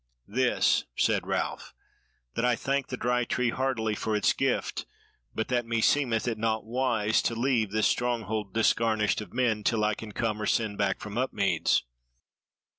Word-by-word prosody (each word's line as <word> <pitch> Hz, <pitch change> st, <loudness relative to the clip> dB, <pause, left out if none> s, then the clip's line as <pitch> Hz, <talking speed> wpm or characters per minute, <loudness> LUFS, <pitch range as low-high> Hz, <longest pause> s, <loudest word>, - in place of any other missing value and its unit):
"This," 125 Hz, +4 st, +2 dB
said -, -, +1 dB
Ralph, -, -, -3 dB, 0.6 s
"that 115 Hz, -, -2 dB
I 125 Hz, -1 st, +3 dB
thanked 135 Hz, +2 st, -1 dB
the -, -, -4 dB
Dry 125 Hz, +1 st, +1 dB
Tree 120 Hz, 0 st, 0 dB
heartily 125 Hz, -5 st, -1 dB
for 110 Hz, +1 st, -2 dB
its 105 Hz, -, +3 dB
gift, -, -, -1 dB, 0.5 s
but 110 Hz, -, -1 dB
that 125 Hz, -1 st, +1 dB
meseemed 115 Hz, 0 st, +2 dB
it 115 Hz, -2 st, -2 dB
naught 110 Hz, 0 st, 0 dB
wise 115 Hz, -3 st, +1 dB
to 115 Hz, -, -1 dB
leave 120 Hz, -3 st, +1 dB
this 110 Hz, +2 st, +1 dB
stronghold 110 Hz, -4 st, -1 dB
disgarnished 110 Hz, 0 st, +2 dB
of 105 Hz, -, -9 dB
men 115 Hz, -4 st, 0 dB
till 110 Hz, -1 st, +1 dB
I 105 Hz, 0 st, +2 dB
can 105 Hz, +1 st, -8 dB
come 110 Hz, 0 st, -2 dB
or 105 Hz, -, -1 dB
send 105 Hz, -3 st, 0 dB
back 100 Hz, -1 st, +1 dB
from 105 Hz, +2 st, -4 dB
Upmeads." 105 Hz, -6 st, +1 dB
115 Hz, 165 wpm, -28 LUFS, 105-125 Hz, 0.6 s, I